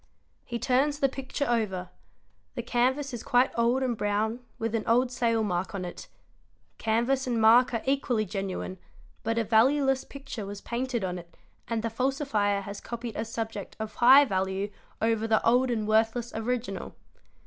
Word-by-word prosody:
He 235 - -4
turns 275 +4 +1
the 275 - +3
picture 270 +2 -3
over: 200 -7 -1 0.7
the 240 - -3
canvas 260 +3 0
is 235 - -4
quite 245 +2 +3
old 235 +3 +2
and 250 -2 0
brown 215 +3 -1 0.2
with 225 -1 -2
an 225 -2 0
old 245 +2 +3
sale 230 -3 +1
mark 185 -1 -2
on 185 -2 -3
it; 175 - -8 0.7
canvas 240 +4 +1
and 240 -2 0
mark 230 +3 +6
are 230 -2 -2
equally 265 -5 +1
genuine, 195 -1 -4 0.4
but 225 +1 -1
a 230 - +2
valueless 265 +5 +3
picture 270 -5 -8
was 200 0 -6
painted 240 -1 -3
on 180 -1 -2
it 170 -1 -15 0.3
and 225 -1 -2
the 230 - 0
falsifer 225 -5 0
has 200 0 -7
copied 235 -1 -6
a 220 - -1
subject 225 -3 -5
of 220 0 -5
high 265 +4 +7
value 190 -1 -1 0.3
over 225 0 +1
the 220 0 +2
old 250 +2 +4
and 220 -3 -1
worthless 225 +2 +1
original. 225 -3 -3
230 Hz, 170 wpm, -28 LUFS, 215-250 Hz, 0.7 s, high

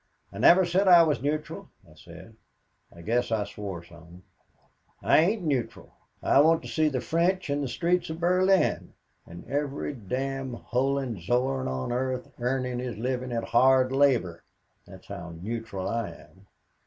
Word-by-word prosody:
"'I - - -8
never 185 +2 +6
said 185 +3 +1
I 175 -2 +8
was 155 -3 0
neutral,' 150 +2 -3 0.2
I - - -18
said. - - -14 0.6
I 85 - -14
guess 120 +5 0
I 110 -2 +1
swore 100 -4 -7
some. 85 +1 -16 0.8
'I - - +4
ain't 190 +5 +1
neutral. 140 -7 -3 0.3
I - - +4
want 160 +2 +3
to - - -8
see 155 -1 +1
the 130 -3 -2
French 170 +1 0
in 145 0 0
the 140 - -2
streets 175 +7 0
of 160 +1 -5
Berlin 185 +2 +2 0.3
and 85 +1 -11
every 145 +1 -3
damned 130 +3 -4
Hohenzollern 130 0 -1
on 65 - -3
earth 130 +1 -3
earning 125 0 -1
his 125 -3 -5
living 125 +2 -3
at 115 -1 -2
hard 130 +1 +3
labor, 125 -12 +1 0.4
that's - - -14
how 85 -1 -8
neutral 105 -1 -5
I 115 -2 -2
am.' 95 +1 -17
130 Hz, 155 wpm, -27 LUFS, 115-150 Hz, 0.8 s, I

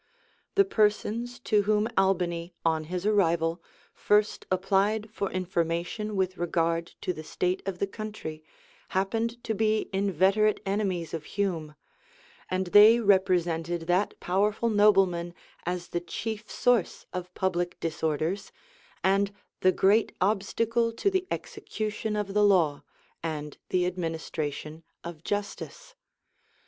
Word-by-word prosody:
The 400 -1 +6
persons 230 - 0
to 210 -4 +3
whom 210 0 +3
Albany, 175 -3 +1
on 160 -1 +1
his 180 +3 -4
arrival, 170 -5 +2 0.3
first 210 0 +1
Applied 200 +3 +1
for 200 -3 -2
information 180 +3 -2
with 185 -1 -1
regard 170 -1 0
to 180 - -1
the 155 - -7
state 180 +4 -1
of 190 -2 -2
the 200 - 0
country, 200 -7 -7 0.5
happened 225 +5 -1
to 225 - -1
be 215 0 0
inveterate 195 +2 +2
enemies 195 -4 -1
of 160 -2 -4
Hume;[*] 170 -7 -2 0.7
and 185 +1 0
they 215 +3 +9
represented 175 -5 +2
that 180 +4 0
powerful 210 +5 +1
nobleman 190 -5 +3 0.3
as 175 -1 -3
the 175 - -2
chief 215 +4 -5
source 245 -7 +1
of 180 0 -5
public 175 -2 -1
disorders, 160 +4 -2 0.5
and 195 +1 +3 0.3
the 185 - +4
great 205 +4 +3
obstacle 225 +4 +1
to 400 - +1
the 375 -1 0
execution 215 0 -4
of 205 -2 -2
the 210 0 +3
law; 170 -8 +3 0.4
and 150 -3 -5
the 180 -1 +2
administration 160 -3 -4 0.2
of 170 -2 -8
justice. 205 - -4
190 Hz, 125 wpm, -28 LUFS, 170-210 Hz, 0.7 s, they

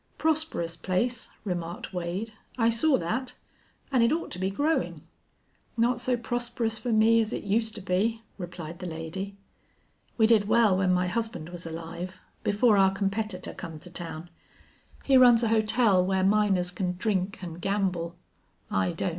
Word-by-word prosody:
"Prosperous 315 - 0
place," 225 +8 -1 0.2
remarked 175 -1 -4
Wade. 180 +5 -3 0.2
"I 230 -1 +3
saw 270 +5 +3
that. 250 +9 -3 0.6
An' 260 -3 +3
it 230 - +4
ought 330 +2 -1
to 180 - -6
be 190 +1 0
growin'." 295 +11 0 0.8
"Not 240 +1 +2
so 250 0 +1
prosperous 235 -1 -2
fer 245 - -2
me 225 +1 +5
as 220 0 -2
it - - -3
uster 215 0 -1
be," 215 +5 0 0.2
replied 175 -2 -7
the 180 - -5
lady. 175 +5 -5 0.8
"We 220 - +5
did 220 -3 +4
well 220 -3 +4
when 185 -1 +2
my 180 0 +2
husband 180 -5 -3
was 175 -1 -7
alive, 170 +3 -6 0.2
before 210 +1 +3
our 190 0 +6
competitor 195 0 -2
come 165 -3 -7
to 180 +3 -12
town. 170 -1 -6 0.7
He 270 -2 +5
runs 245 -2 +7
a 225 - +2
hotel 215 -3 +3
where 190 0 +1
miners 195 -3 +3
can 180 -1 -2
drink 195 -1 -1
an' 170 -1 -6
gamble. 185 -4 -1 0.6
I 95 -1 +1
don't.... - - -1
200 Hz, 160 wpm, -27 LUFS, 180-230 Hz, 0.8 s, runs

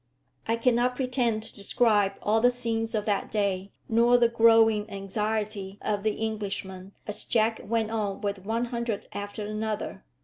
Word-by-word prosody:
I 225 - +2
cannot 245 +1 +2
pretend 250 -4 0
to 225 - -9
describe 205 -1 +2
all 220 +2 +3
the 245 - +6
scenes 230 -2 -2
of 210 -1 -1
that 205 -2 0
day, 200 -2 -1 0.2
nor 235 +2 +5
the 235 -1 +4
growing 225 -2 +5
anxiety 205 0 -3
of 205 -1 -1
the 215 +1 -1
Englishmen 195 -3 -5
as 210 - -5
Jack 225 -1 +1
went 225 0 -1
on 205 -3 -2
with 200 -2 -2
one 225 +4 -1
hundred 235 -3 -3
after 205 +1 -5
another. 215 -2 -3
220 Hz, 160 wpm, -27 LUFS, 205-230 Hz, 0.2 s, the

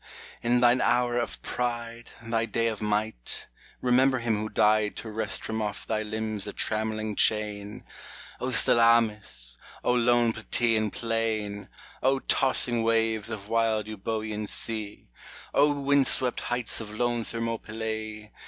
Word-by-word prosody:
in 120 +1 +2
thine 125 +1 +4
hour 120 0 +2
of 120 - -3
pride, 120 -1 -4
Thy 115 0 -1
day 115 +1 -1
of 110 -2 -6
might, 105 - -1 0.4
remember 130 +1 +3
him 115 -2 0
who 110 +1 -3
died 105 0 +2
To 110 - -7
wrest 110 -1 0
from 110 0 -3
off 105 -1 -4
thy 110 -1 -1
limbs 110 -1 -3
the 105 - -5
trammelling 110 0 -1
chain: 105 -1 0 0.6
O - - -2
Salamis! 105 - +3 0.3
O 125 - +2
lone 120 -1 +3
Plataean 110 -1 +1
plain! 110 -3 -3 0.3
O 135 +1 +3
tossing 130 -3 +2
waves 115 -1 +1
of 105 -3 -6
wild 115 -1 +1
Eubcean 110 0 -4
sea! 110 -2 -4 0.5
O 145 +1 +4
wind 140 -1 +2
swept 125 -2 +4
heights 120 -1 0
of 105 -1 -8
lone 120 +1 -1
Thermopylae 110 -2 -5
110 Hz, 135 wpm, -27 LUFS, 110-120 Hz, 0.6 s, thine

